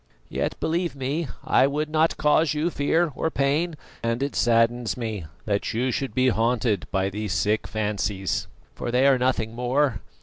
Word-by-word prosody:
Yet, - - -2
believe 170 0 -1
me, 140 +4 -2 0.2
I 130 - +4
would 150 +2 -1
not 160 +1 +2
cause 150 +1 +3
you 160 +4 0
fear 160 +3 +1
or 160 - 0
pain, 155 +4 0 0.3
and 115 +3 -1
it 140 - -3
saddens 120 0 +2
me 110 -8 -4 0.2
that 100 0 -1
you 125 +3 +1
should 135 +2 -3
be 130 0 +4
haunted 115 -4 +1
by 95 0 0
these 105 -1 -3
sick 105 +3 +1
fancies, 105 -3 -2 0.3
for - - -5
they 125 +3 +3
are 135 -2 +5
nothing 125 -3 0
more. 125 -1 0
125 Hz, 170 wpm, -25 LUFS, 110-145 Hz, 0.3 s, are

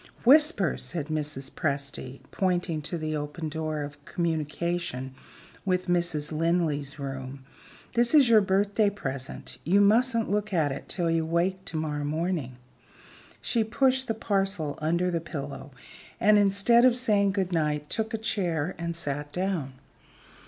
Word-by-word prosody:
"Whisper!" 270 - +5
said 160 -3 -4
Mrs. 150 -3 -3
Presty, 140 -3 -3
pointing 175 -4 0
to 170 +3 -4
the 155 -1 -3
open 150 +2 -4
door 155 -1 -3
of 145 0 -9
communication 160 -4 -2 0.5
with 185 -2 0
Mrs. 170 -4 0
Linley's 155 -3 0
room. 135 -1 -6 0.5
"This 240 +4 +3
is 285 -4 +7
your 225 -2 +6
birthday 200 +2 +2
present. 135 -9 -6
You 185 +6 +3
mustn't 230 +3 +3
look 210 +1 -1
at 155 -5 +2
it 135 - -7
till 170 -3 0
you 165 0 +1
wake 175 +4 0
to 165 - -4
morrow 150 -2 -2
morning." 155 -4 -2 0.9
She 230 -2 +1
pushed 260 +3 +1
the 225 - -1
parcel 195 -8 -1
under 170 +3 +1
the 170 -1 -1
pillow 140 -4 -6 0.5
and, 210 0 +5
instead 205 +4 +4
of 250 -1 +5
saying 205 -5 +2
good 190 -2 -1
night, 150 -2 0
took 220 +4 -2
a 225 - -1
chair 180 -7 -1
and 170 0 -3
sat 145 -2 -3
down. 180 -7 -2
170 Hz, 145 wpm, -27 LUFS, 150-200 Hz, 0.9 s, is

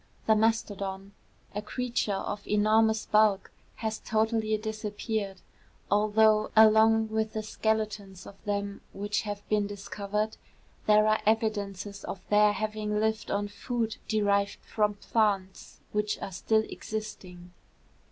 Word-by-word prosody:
The 220 - +5
mastodon, 200 -3 -1 0.4
a 205 - -3
creature 235 -2 -2
of 205 +1 -4
enormous 220 +1 +3
bulk, 210 -2 +3 0.2
has 220 -1 -3
totally 220 0 +1
disappeared, 215 -2 -4 0.5
although, 215 +1 +4
along 220 0 +6
with 220 0 -1
the 215 - -3
skeletons 210 -3 -2
of 200 - -13
them 200 -1 -3
which 205 +1 -1
have 205 -1 -6
been 210 -1 +1
discovered, 205 +2 -3 0.5
there 215 0 +6
are 215 0 +2
evidences 205 -3 -1
of 195 - -5
their 210 0 +6
having 215 0 -2
lived 220 0 -1
on 205 +1 0
food 225 +1 -3
derived 200 -2 +1
from 210 -1 0
plants 200 -3 -1
which 210 0 0
are - - -5
still 220 +4 +1
existing. 180 -5 -7
210 Hz, 125 wpm, -28 LUFS, 200-220 Hz, 0.5 s, along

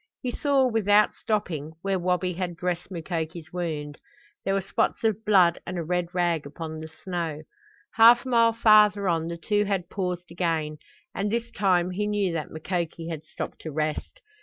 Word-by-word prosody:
He 250 - -1
saw, 275 0 +2
without 210 -3 +3
stopping, 160 -8 -2
where 195 -1 0
Wabi 180 +1 0
had 175 -1 -3
dressed 175 +1 -3
Mukoki's 165 -2 -5
wound. 155 -5 -4 0.4
There 195 - 0
were 195 - +1
spots 190 - -1
of 220 -1 +1
blood 185 -5 +4
and 185 - -5
a 170 - -2
red 180 +1 -1
rag 175 -4 0
upon 160 +1 -7
the 160 - -7 0.2
snow. 165 -5 -3 0.5
Half 235 +3 +7
a - - -4
mile 230 -2 +4
farther 210 -3 +5
on 165 -2 +1
the 170 0 -4
two 205 +4 +1
had 190 -3 -2
paused 180 -3 -3
again, 160 -3 -1 0.3
and 200 +2 -2
this 235 +1 -2
time 185 -2 +2
he 205 +3 -1
knew 205 -4 0
that 160 -2 -3
Mukoki 165 0 -4
had 160 -2 -5
stopped - - -7
to 160 - -6
rest. 155 - -3
180 Hz, 180 wpm, -26 LUFS, 165-205 Hz, 0.5 s, Half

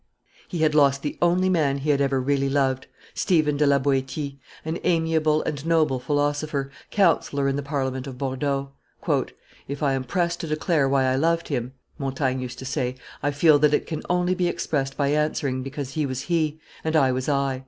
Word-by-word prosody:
He 170 -4 -2
had 155 -1 +3
lost 140 -2 +4
the 145 - -3
only 175 +2 +3
man 155 -7 +2
he 145 +2 0
had 140 -1 +2
ever 135 -1 +2
really 140 +1 +1
loved, 135 -2 0 0.3
Stephen 155 -5 +2
de 145 0 +2
la 140 0 +5
Boetie, 140 +1 -1 0.3
an 160 +2 -2
amiable 160 -2 +2
and 145 -2 -3
noble 155 -5 +2
philosopher, 145 0 -1 0.2
counsellor 160 -7 +2
in 135 - +1
the 145 - -1
Parliament 135 -2 -3
of 130 -2 -7
Bordeaux. 135 +1 -2 1.0
"If 140 +2 -5
I 140 -2 +2
am 135 -1 -1
pressed 170 +6 -1
to 165 - -4
declare 155 -2 +1
why 135 -1 +3
I 130 0 +2
loved 165 +3 +1
him," 125 -3 -2 0.3
Montaigne 135 -1 -1
used 125 -1 -6
to 130 - -8
say, 130 -2 -2 0.3
"I 145 - +1
feel 145 +1 +5
that 150 0 +4
it - - -1
can 155 -2 -4
only 180 +1 +2
be 180 -1 0
expressed 135 -5 -2
by 140 -1 +1
answering, 145 -3 0
because 135 0 -5
he 150 0 -1
was 130 -1 -3
he, 160 -1 0 0.2
and 160 0 -1
I 135 -4 +4
was 130 +2 -2
I." 140 -2 0
145 Hz, 195 wpm, -24 LUFS, 135-155 Hz, 1.0 s, la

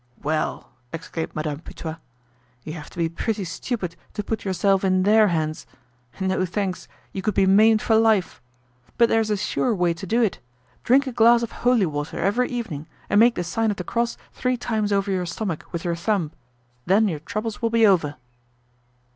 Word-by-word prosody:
"Well!" 155 -3 -2 0.2
exclaimed 165 0 -5
Madame 150 -1 -3
Putois. 160 -1 -7 0.7
"You 155 - -6
have 155 -3 -8
to - - -17
be 170 -1 +1
pretty 200 +5 -2
stupid 180 0 -4 0.2
to 210 - -2
put 220 +1 -3
yourself 195 0 +1
in 185 -1 +2
their 215 +2 +5
hands. 155 - -2 0.5
No 190 -1 0
thanks, 185 0 -3 0.3
you 190 - -3
could 205 +1 -1
be 195 - +4
maimed 215 +4 +5
for 225 - +3
life. 220 - +2 0.6
But 235 -1 +5
there's 225 -1 +2
a 210 - +1
sure 230 +4 0
way 175 -2 +2
to 185 +3 -8
do 230 +6 +1
it. 215 - 0 0.4
Drink 270 +4 +4
a 260 - -3
glass 235 0 +5
of 230 - -4
holy 245 -5 +2
water 145 -2 -4
every 225 +7 +1
evening 185 - -5 0.2
and 205 - +5
make 235 +1 +5
the 175 - -2
sign 220 +6 0
of 205 - -2
the 180 - -4
cross 235 +6 -1 0.2
three 255 -1 -1
times 220 -3 -1
over 200 0 +1
your 180 -2 -1
stomach 175 -2 -4
with 170 0 -4
your 170 -1 0
thumb. 170 -3 -1 0.6
Then 205 +4 +4
your 160 -6 -2
troubles 215 +8 -4
will 230 - +1
be 230 -1 +4
over." 165 -8 +3
195 Hz, 190 wpm, -23 LUFS, 170-225 Hz, 0.7 s, their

